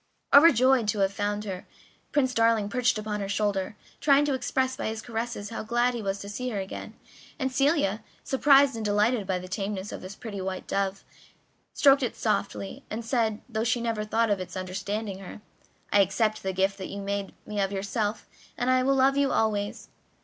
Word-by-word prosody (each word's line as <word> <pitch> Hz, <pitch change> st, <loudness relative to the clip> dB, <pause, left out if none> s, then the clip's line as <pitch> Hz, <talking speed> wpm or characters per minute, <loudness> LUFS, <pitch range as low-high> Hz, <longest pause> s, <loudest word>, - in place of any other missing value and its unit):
Overjoyed 265 Hz, -5 st, +6 dB
to 210 Hz, +1 st, 0 dB
have 195 Hz, 0 st, +2 dB
found 205 Hz, +1 st, -2 dB
her, 190 Hz, -3 st, -6 dB, 0.4 s
Prince 260 Hz, -3 st, +2 dB
Darling 230 Hz, -3 st, +3 dB
perched 250 Hz, +1 st, +1 dB
upon 210 Hz, -1 st, -3 dB
her 200 Hz, -1 st, -4 dB
shoulder, 205 Hz, -1 st, -1 dB, 0.2 s
trying 285 Hz, -1 st, +4 dB
to 290 Hz, -, 0 dB
express 260 Hz, 0 st, 0 dB
by -, -, -3 dB
his 220 Hz, 0 st, -3 dB
caresses 230 Hz, -2 st, -4 dB
how -, -, -4 dB
glad 240 Hz, +3 st, +1 dB
he 235 Hz, -, -4 dB
was 195 Hz, -1 st, -2 dB
to 200 Hz, -, -7 dB
see 250 Hz, +5 st, -4 dB
her 220 Hz, -, -3 dB
again, 190 Hz, 0 st, -7 dB, 0.4 s
and 265 Hz, -4 st, -1 dB
Celia, 255 Hz, -, +1 dB, 0.2 s
surprised 275 Hz, 0 st, +5 dB
and 225 Hz, -, -4 dB
delighted 210 Hz, +1 st, +1 dB
by 185 Hz, -, 0 dB
the 180 Hz, 0 st, -7 dB
tameness 195 Hz, +1 st, -4 dB
of -, -, -7 dB
this 185 Hz, +2 st, -8 dB
pretty 205 Hz, -4 st, -6 dB
white 185 Hz, 0 st, -4 dB
dove, 195 Hz, 0 st, -2 dB, 0.7 s
stroked 280 Hz, -1 st, +5 dB
it 250 Hz, -, -2 dB
softly, 100 Hz, 0 st, -2 dB
and 225 Hz, +1 st, -5 dB
said, 225 Hz, -3 st, 0 dB
though 220 Hz, -3 st, -2 dB
she 240 Hz, +1 st, +1 dB
never 230 Hz, -2 st, -1 dB
thought 225 Hz, +1 st, +1 dB
of 200 Hz, -, +1 dB
its 185 Hz, +1 st, -6 dB
understanding 195 Hz, +2 st, -4 dB
her: 195 Hz, +2 st, -9 dB, 0.5 s
"I 205 Hz, -, +7 dB
accept 215 Hz, +3 st, +1 dB
the 190 Hz, -, -2 dB
gift 195 Hz, +1 st, 0 dB
that 190 Hz, -, -5 dB
you 200 Hz, -, -6 dB
make 200 Hz, 0 st, -3 dB
me 210 Hz, -1 st, -2 dB
of 195 Hz, 0 st, 0 dB
yourself, 205 Hz, +2 st, -2 dB, 0.3 s
and 245 Hz, +1 st, +1 dB
I 255 Hz, 0 st, +4 dB
will 270 Hz, +2 st, +2 dB
love 270 Hz, +1 st, +4 dB
you 280 Hz, -1 st, +2 dB
always." 205 Hz, -2 st, -1 dB
215 Hz, 200 wpm, -27 LUFS, 200-245 Hz, 0.7 s, I